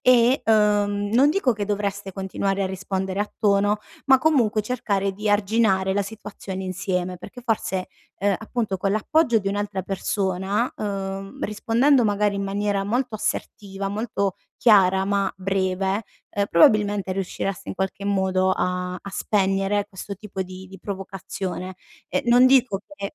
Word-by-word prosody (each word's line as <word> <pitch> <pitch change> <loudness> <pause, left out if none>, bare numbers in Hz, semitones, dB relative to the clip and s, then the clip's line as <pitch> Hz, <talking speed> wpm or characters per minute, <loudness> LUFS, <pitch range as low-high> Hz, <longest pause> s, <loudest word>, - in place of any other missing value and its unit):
e, 250 +1 +5
uhm, 205 -2 +2
non 280 +4 +6
dico 310 -8 +2
che 205 -1 -3
dovreste 200 -1 -2
continuare 195 0 -2
a - - +1
rispondere 190 0 -3
a 210 - -2
tono, 205 0 +3 0.3
ma 265 -1 +7
comunque 250 -8 +3
cercare 200 -4 -1
di 210 +2 -2
arginare 200 -2 +2
la 205 - +2
situazione 195 -2 -7
insieme, 185 -1 -2
perché 205 +7 -11
forse, 215 -6 -1 0.3
uhm, 200 0 +2
appunto 220 -2 -3
con 195 +2 -1
l'appoggio 235 +3 +2
di 195 -2 -2
un'altra 205 -1 -2
persona, 195 +3 -1
uhm, 195 -1 -4
rispondendo 235 +5 +3
magari 205 -1 +1
in 200 - -2
maniera 200 0 -1
molto 245 +3 -1
assertiva, 200 -2 -3
molto 200 -2 -1 0.2
chiara 190 -4 +5
ma 200 -1 +1
breve, 190 +1 0 0.3
uhm, 200 - +3
probabilmente 205 +2 +4
riuscireste 195 0 -3
in - - -5
qualche 190 +1 -3
modo 190 -2 +1
a 180 -1 -1
a 200 - -8
spegnere 195 0 +1
questo 200 0 -7
tipo 195 -1 -5
di 185 0 -10
di 190 +1 -12
provocazione. 190 -1 -5 0.3
E 185 - 0
non 245 +1 +6
dico 255 -6 +4
che 200 -5 -6
200 Hz, 150 wpm, -23 LUFS, 190-215 Hz, 0.3 s, ma